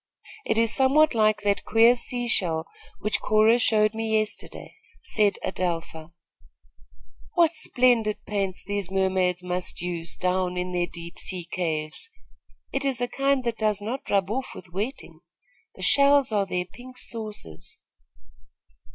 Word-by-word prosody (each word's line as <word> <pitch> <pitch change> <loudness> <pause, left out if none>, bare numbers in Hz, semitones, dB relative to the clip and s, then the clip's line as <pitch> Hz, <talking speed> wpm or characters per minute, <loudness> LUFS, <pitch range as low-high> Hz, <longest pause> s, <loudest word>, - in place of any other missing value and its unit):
"It - - +1
is 230 0 +3
somewhat 280 +3 +4
like 215 -2 +2
that 200 -1 +1
queer 230 +2 +5
sea 245 0 -3
shell 165 -8 0 0.4
which 210 - -1
Cora 215 +2 +4
showed 215 -2 +3
me 220 0 0
yesterday," 215 -1 -4 0.3
said 210 - +1
Adelpha. 165 -2 -3 1.2
"What 335 -2 +4
splendid 245 -8 +2
paints 195 -3 -2
these 200 -1 -3
mermaids 185 -2 +1
must 180 0 -2
use, 170 -1 -3
down 180 0 0
in 180 0 -2
their 175 -1 0
deep 170 0 -9
sea 180 -2 -2
caves! 160 - -3 0.6
It 275 - -1
is 270 -3 0
a 245 - 0
kind 275 +1 +1
that 235 -2 -2
does 215 -2 +1
not 230 +6 -5
rub 195 0 +1
off 260 +3 -3
with 175 - -12
wetting. 215 +9 -5 0.6
The - - -8
shells 280 -2 +5
are 200 -2 +1
their 180 -1 -2
pink 250 +7 -13
saucers." 210 - -7
210 Hz, 140 wpm, -25 LUFS, 180-240 Hz, 1.2 s, queer